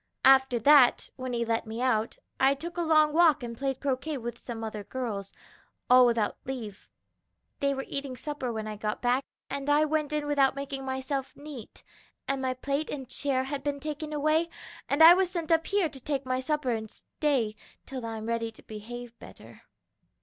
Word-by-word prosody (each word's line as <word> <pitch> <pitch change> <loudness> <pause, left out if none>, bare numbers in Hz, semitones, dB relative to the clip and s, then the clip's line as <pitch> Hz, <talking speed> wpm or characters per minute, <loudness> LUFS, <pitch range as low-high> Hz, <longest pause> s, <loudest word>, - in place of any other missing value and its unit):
"After 265 -2 +6
that, 270 +1 +5
when 255 -1 -5
he 235 -1 0
let 225 0 -1
me 220 +1 -5
out, 230 -3 0 0.2
I 270 +1 +4
took 340 +5 -7
a 350 - -1
long 310 -2 +4
walk 315 -4 +5
and 235 -1 -5
played 270 +1 -2
croquet 280 +2 -2
with 235 -1 -6
some 230 -2 -6
other 215 -2 -5
girls 205 -5 -4 0.6
all 250 0 +8
without 230 -3 0
leave. 230 -7 -7 0.7
"They 280 0 +1
were 270 - -4
eating 275 -2 -4
supper 275 -2 -4
when 220 -1 -4
I 215 -1 -5
got 210 +2 -3
back, 250 +2 +2 0.2
and 280 +1 -4
I 295 +1 +4
went 305 -1 -1
in 300 -1 -1
without 280 -2 +3
making 275 -1 -5
myself 265 +1 -3
neat, 285 -6 -10 0.4
and 275 -1 -1
my 260 -1 -1
plate 280 +4 -2
and 270 -3 -5
chair 260 0 -1
had 275 +1 -4
been 285 0 -2
taken 305 +1 -5
away, 310 +3 +1 0.4
and 290 +3 +5
I 330 +2 +11
was 370 0 +2
sent 340 -3 -3
up 325 0 +3
here 400 -4 +2
to 275 -3 -8
take 275 0 -3
my 255 0 0
supper 295 -1 -1
and 220 -1 -3
stay 255 -7 -1 0.3
till 260 -2 -6
I'm 225 -1 -5
ready 230 0 -1
to - - -17
behave 235 +2 -9
better." - - -13
265 Hz, 195 wpm, -28 LUFS, 235-295 Hz, 0.7 s, I